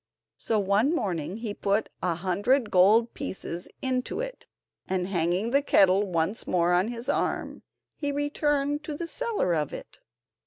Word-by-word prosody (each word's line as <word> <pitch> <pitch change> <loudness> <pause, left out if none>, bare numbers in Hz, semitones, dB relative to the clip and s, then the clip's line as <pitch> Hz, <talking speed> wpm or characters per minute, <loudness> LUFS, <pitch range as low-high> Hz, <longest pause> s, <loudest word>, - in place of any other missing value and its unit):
So, 225 - 0
one 210 - +2
morning, 180 - -2
he 225 -3 -4
put 205 +1 0
a 175 -2 0
hundred 205 - +1
gold 215 +6 +5
pieces 190 - -5 0.2
into 255 -1 -1
it, - - -6 0.4
and 185 -1 0
hanging 180 +4 0
the 280 +2 +4
kettle 195 -6 +4
once 170 +6 -1
more 175 -1 +2
on 180 +3 +3
his 235 +1 -5
arm, - - -1 0.3
he 290 -2 -3
returned 290 0 0
to 305 - -4
the 340 - -4
seller 440 - 0
of 150 -3 -1
it. - - -9
210 Hz, 155 wpm, -27 LUFS, 180-280 Hz, 0.4 s, gold